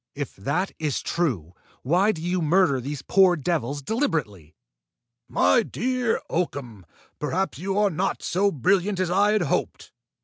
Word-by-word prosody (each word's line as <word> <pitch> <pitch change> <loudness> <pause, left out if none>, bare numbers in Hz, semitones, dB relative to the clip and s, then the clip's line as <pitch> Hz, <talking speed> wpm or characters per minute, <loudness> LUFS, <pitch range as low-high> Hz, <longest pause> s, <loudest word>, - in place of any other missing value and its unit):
"If 145 -1 -5
that 145 - -2
is 150 -4 -1
true, 115 - -1 0.3
why 180 +10 +3
do 160 -5 -7
you 180 +1 0
murder 160 -4 +3
these 140 +2 -5
poor 190 -2 +4
devils 145 -3 -2
deliberately!" 135 - -2 0.7
"My 90 +1 +4
dear 250 -1 -1
Oakham, 125 - -4 0.3
perhaps 160 -1 -2
you 195 +3 -2
are 205 -1 +3
not 185 +4 -2
so 200 +3 +1
brilliant 190 - +1
as 185 -2 0
I 205 +3 +3
had 215 - +2
hoped! - - -2
170 Hz, 145 wpm, -24 LUFS, 140-195 Hz, 0.7 s, poor